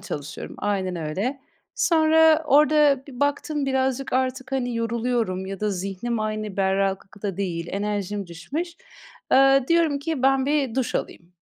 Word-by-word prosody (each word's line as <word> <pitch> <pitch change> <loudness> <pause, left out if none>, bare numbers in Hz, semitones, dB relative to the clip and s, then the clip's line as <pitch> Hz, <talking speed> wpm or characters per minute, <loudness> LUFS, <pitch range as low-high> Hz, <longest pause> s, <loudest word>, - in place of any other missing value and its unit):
çalışıyorum, 150 -6 -7
aynen 190 -3 -1
öyle. 195 - -3 0.3
Sonra 320 -1 +4
orada 295 -1 +4
bir 255 -4 -10
baktım 285 0 0
birazcık 265 0 -1
artık, 260 +1 -1
hani, 245 -2 -1
yoruluyorum 230 -4 -1
ya 195 0 -6
da 210 0 0
zihnim 195 +5 -3
aynı 215 -2 -3
berraklıkta 195 0 -1
değil, 175 -4 -3
enerjim 205 0 -3
düşmüş. 270 - -5 0.6
Eee, 270 0 +6
diyorum 330 -4 +3
ki, 295 -2 -3
"Ben 270 0 +3
bir 280 -5 0
duş 260 -2 -1
alayım." 175 +1 -5
240 Hz, 135 wpm, -24 LUFS, 195-275 Hz, 0.6 s, Eee